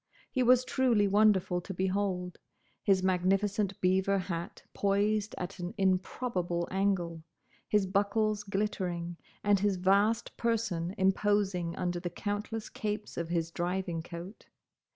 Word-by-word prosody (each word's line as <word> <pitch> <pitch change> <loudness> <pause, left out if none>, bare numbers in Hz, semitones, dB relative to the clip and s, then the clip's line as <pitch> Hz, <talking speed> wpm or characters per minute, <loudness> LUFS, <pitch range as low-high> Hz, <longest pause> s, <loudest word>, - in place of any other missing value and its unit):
He 255 - 0
was 250 0 +5
truly 240 -6 +3
wonderful 195 -3 +3
to 190 +2 -7
behold: 185 -1 -1 0.4
his 190 -2 +3
magnificent 195 +2 +1
beaver 190 +2 +3
hat 175 -3 -4
poised 205 +1 +1
at 185 +2 -5
an 175 +5 -5
improbable 185 -2 0
angle, 185 -4 0 0.5
his 210 -2 +2
buckles 205 +2 +1
glittering, 185 -4 -2 0.3
and 205 -1 +4
his 200 0 +2
vast 200 +5 +2
person 210 -7 -1
imposing 190 -3 +1
under 175 -2 -2
the 175 - -3
countless 210 +4 -4
capes 210 0 -4
of 170 -1 -3
his 165 -1 -1
driving 175 -1 -2
coat. 175 +5 -9
195 Hz, 125 wpm, -31 LUFS, 180-205 Hz, 0.5 s, was